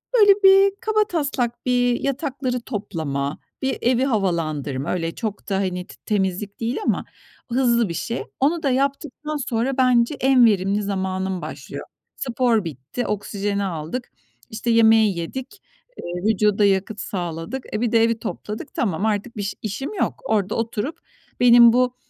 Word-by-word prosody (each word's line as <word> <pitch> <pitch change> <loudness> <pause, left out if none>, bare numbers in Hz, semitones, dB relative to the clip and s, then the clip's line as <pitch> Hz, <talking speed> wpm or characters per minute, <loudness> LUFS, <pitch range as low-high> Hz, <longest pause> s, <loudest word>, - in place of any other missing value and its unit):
böyle 415 -4 +7
bir, 390 +1 +7
kabataslak 315 - 0
bir 245 -1 +2
yatakları 270 -2 -2
toplama, 160 - -3 0.2
bir 265 0 -1
evi 245 +1 +2
havalandırma. 155 - -1
Öyle, 165 -2 -2
çok 215 -2 -5
da, 195 - 0
hani, 180 -1 -2
t - - -13
temizlik 200 -1 -1
değil 235 +3 -2
ama - - 0 0.5
hızlı 235 -3 +2
bir - - -3
şey. 230 +8 -3 0.2
Onu 315 +5 +1
da 280 - +2
yaptıktan 280 +3 -1
sonra 255 0 -1
bence 250 +1 +3
en 260 -2 +5
verimli 200 -1 +2
zamanım 190 -2 -2
başlıyor. - - -7 0.3
Spor 240 -4 +1
bitti, 155 - -5
oksijeni 205 0 -2
aldık, 175 +6 -4 0.4
işte, 220 +2 -4
yemeği 220 -4 +5
yedik, 260 - -6 0.4
eee, 175 +1 -5
vücuda 210 -1 +3
yakıt 200 +2 +1
sağladık, 175 +6 -4
e, 215 - -1
bir 240 -2 +1
de 230 -1 +4
evi 230 0 +1
topladık. 215 -1 -6
Tamam, 195 -3 -1
artık 220 +2 -2
biş 205 -1 -2
işim 220 - -4
yok. - - -2
Orada 210 -2 0
oturup 230 +5 -3 0.4
benim 240 -1 +8
bu, 250 0 +2
225 Hz, 145 wpm, -22 LUFS, 195-255 Hz, 0.5 s, benim